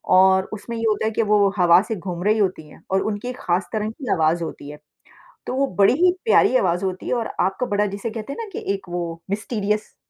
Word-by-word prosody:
और 190 0 +5
उसमें 230 +2 -6
ये 225 - -4
होता 215 0 0
है 220 - +1
कि 225 - 0
वो 205 -1 +5
हवा 175 -1 +6
से 225 - -1
घूम 180 -2 -5
रही 215 +2 +3
होती 185 -6 -1
है - - -16
और 190 0 +2
उनकी 210 +4 -4
खास 180 +2 0
तरंग 215 0 -2
की 260 +1 -5
आवाज़ 165 +1 +1
होती 145 -3 -7
है, 150 - -9 0.7
तो - - -2
वो 275 +1 +1
बड़ी 200 +4 +5
ही 365 - +6
प्यारी 445 - +4
आवाज़ 180 -3 0
होती 185 -1 -4
है - - 0
और 230 -2 -1
आपको 195 +6 0
बड़ा 205 0 +1
जिसे 205 +3 -4
कहते 225 +4 -6
हैं - - -10
ना 435 - -8
कि - - -5
एक 195 -2 -7
वो 175 0 -2 0.3
मिस्टीरियस 210 0 -2
200 Hz, 240 wpm, -22 LUFS, 180-220 Hz, 0.7 s, हवा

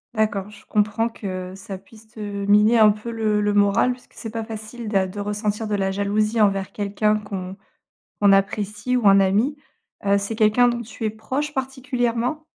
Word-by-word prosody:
D'accord, 210 -2 0
je 210 - -15
comprends 215 +2 +1
que 185 -4 -6
ça 195 -1 -8
puisse 220 +2 -18
te 220 0 -15
miner 205 +2 +3
un 215 -1 +7
peu 215 +3 -6
le 215 -2 0
le 205 0 +1
moral 205 +5 +3
puisque 245 - -18
c'est 225 - -7
pas 225 0 -4
facile 220 +1 -7
d'a 195 -3 +1
de 205 +2 -8
ressentir 210 +1 -2
de 210 - -3
la 195 -1 +1
jalousie 210 +3 0
envers 195 -2 +2
quelqu'un 210 +1 0
qu'on 195 -2 -6 0.6
qu'on 200 -1 +6
apprécie 210 +4 0
ou 220 -4 +2
un 195 0 +7
ami, 210 +10 +2 0.5
heu, 200 0 +4
c'est 200 +3 -3
quelqu'un 220 +3 +4
dont 240 0 -1
tu 225 0 -7
es - - +2
proche 260 +8 -4
particulièrement? 255 +1 -2
210 Hz, 185 wpm, -22 LUFS, 200-230 Hz, 0.6 s, un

